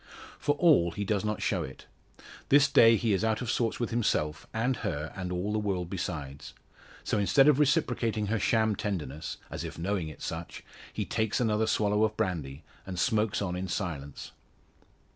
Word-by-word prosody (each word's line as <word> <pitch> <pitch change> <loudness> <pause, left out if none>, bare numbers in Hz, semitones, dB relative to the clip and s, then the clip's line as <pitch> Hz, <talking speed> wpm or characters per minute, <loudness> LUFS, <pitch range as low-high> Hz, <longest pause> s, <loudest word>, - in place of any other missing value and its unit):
For 145 - +1
all 145 - +4
he 100 +5 -4
does 100 -1 0
not 105 0 -2
show - - 0
it. 65 - -8 0.6
This 140 0 +6
day 115 -5 +6
he 110 -1 +1
is 95 - 0
out 110 -1 +1
of 125 -2 -2
sorts 115 -2 0
with 120 - -2
himself, 80 -10 0
and 125 +3 0
her 80 -7 -4
and 90 -1 -4
all 90 +4 -2
the 110 - +1
world 95 -4 -2
besides; 75 -7 -5 0.5
so - - 0
instead 135 +8 +4
of 150 -2 +5
reciprocating 125 -8 +1
her 110 +2 0
sham 110 +1 +2
tenderness 80 -8 -4
as - - -4
if - - -7
knowing 90 0 -1
it 75 - -11
such - - -6 0.3
he - - -3
takes 110 -2 -1
another 110 -2 +1
swallow 105 0 +2
of 110 0 0
brandy, 75 -5 -3 0.2
and 95 -1 -7
smokes 105 +1 +1
on 90 -2 -2
in 95 +1 -3
silence. 80 -7 -5
105 Hz, 180 wpm, -29 LUFS, 90-115 Hz, 0.6 s, This